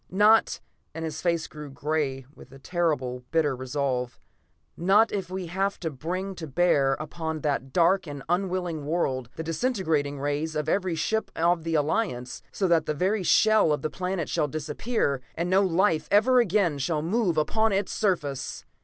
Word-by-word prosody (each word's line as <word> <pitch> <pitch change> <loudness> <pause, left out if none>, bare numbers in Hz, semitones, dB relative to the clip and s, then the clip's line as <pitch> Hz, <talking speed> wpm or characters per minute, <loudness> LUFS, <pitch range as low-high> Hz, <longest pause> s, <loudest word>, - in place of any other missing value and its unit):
Not" 210 +4 +4 0.3
and 165 0 -4
his 155 -1 -5
face 170 -2 0
grew 150 -1 -9
gray 140 -2 -2
with - - -15
a 135 - -12
terrible 145 -5 -1
and 125 0 -20
bitter 155 -4 +1
resolve 130 -1 -2 0.6
"not 200 +6 +4
if 195 -3 -3
we 185 0 -4
have 195 +4 -2
to 160 -3 -2
bring 180 +8 -4
to 160 - -6
bear 140 -2 +3
upon 160 0 -4
that 135 -3 -1
dark 175 +4 +3
and 145 -2 -7
unwilling 175 -3 -1
world 130 -7 -1
the 160 - -5
disintegrating 160 - -1
rays 145 +3 -2
of 150 0 -2
every 185 0 0
ship 220 +7 -1
of 170 0 +2
the 165 0 -1
Alliance, 145 - -1
so 195 - 0
that 170 -2 +2
the 155 - -1
very 190 +7 +1
shell 215 -1 +4
of 150 -2 -1
the 155 - -2
planet 180 -3 -3
shall 150 - 0
disappear, 150 - -2
and 175 +2 -2
no 190 +1 +5
life 180 -3 +2
ever 250 +5 +5
again 190 -9 +2
shall 150 +2 -1
move 185 -1 0
upon 220 +8 +2
its 195 0 0
surface. 150 - -2
165 Hz, 175 wpm, -26 LUFS, 145-190 Hz, 0.6 s, no